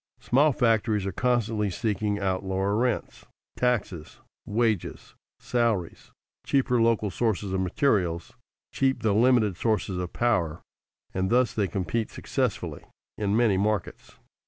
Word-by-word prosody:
Small 145 +5 +3
factories 110 -4 +1
are 95 - -2
constantly 115 -1 0
seeking 105 0 -1
out 95 -1 -1
lower 95 +1 -1
rents, 120 0 -2 0.3
taxes, 105 -10 -1 0.3
wages, 110 -3 -1 0.3
salaries, 115 -8 -1 0.3
cheaper 125 -3 +1
local 115 -3 +2
sources 100 -1 -1
of 95 - 0
materials, 90 -5 0 0.4
cheap 135 -3 0
though 105 -3 +2
limited 110 -5 +3
sources 100 -4 -1
of 90 -1 -4
power, 90 -10 0 0.5
and 95 0 -1
thus 125 -1 +3
they 105 -3 0
compete 95 +5 -2
successfully - - -3 0.3
in 105 0 0
many 115 -5 +3
markets. 105 -1 -2
105 Hz, 125 wpm, -26 LUFS, 95-120 Hz, 0.5 s, Small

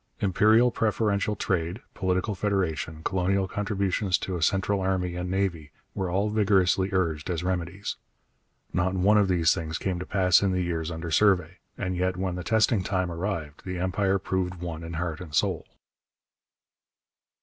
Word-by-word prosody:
Imperial 110 +5 +4
preferential 105 -2 0
trade, 90 0 -1
political 95 +3 0
federation, 90 -6 -2
colonial 95 +1 +1
contributions 100 -1 0
to 95 - -4
a 85 - -4
central 95 +4 +1
army 95 -2 0
and 90 0 -3
navy, 90 -6 -1 0.2
were 95 -2 -2
all 100 +4 0
vigorously 95 -3 +3
urged 85 -5 -1
as 85 -1 -2
remedies. 90 +1 -3 0.8
Not 95 +1 +1
one 100 +3 +4
of 100 - +3
these 85 -3 +3
things 80 -2 -3
came 95 -2 -2
to 90 - -5
pass 90 -3 +4
in 100 -2 +1
the 90 0 0
years 85 -2 -2
under 80 0 -5
survey, 90 -2 +3 0.2
and 95 -1 -2
yet 90 0 0
when 95 -1 -1
the 90 0 -5
testing 110 0 +2
time 95 -2 -1
arrived 85 -4 -4
the 90 -1 -4
Empire 95 +2 +1
proved 95 -1 -2
one 85 -2 -6
in 85 0 -6
heart 85 -1 -3
and 80 -4 -7
soul. - - 0
95 Hz, 160 wpm, -27 LUFS, 85-100 Hz, 0.8 s, Imperial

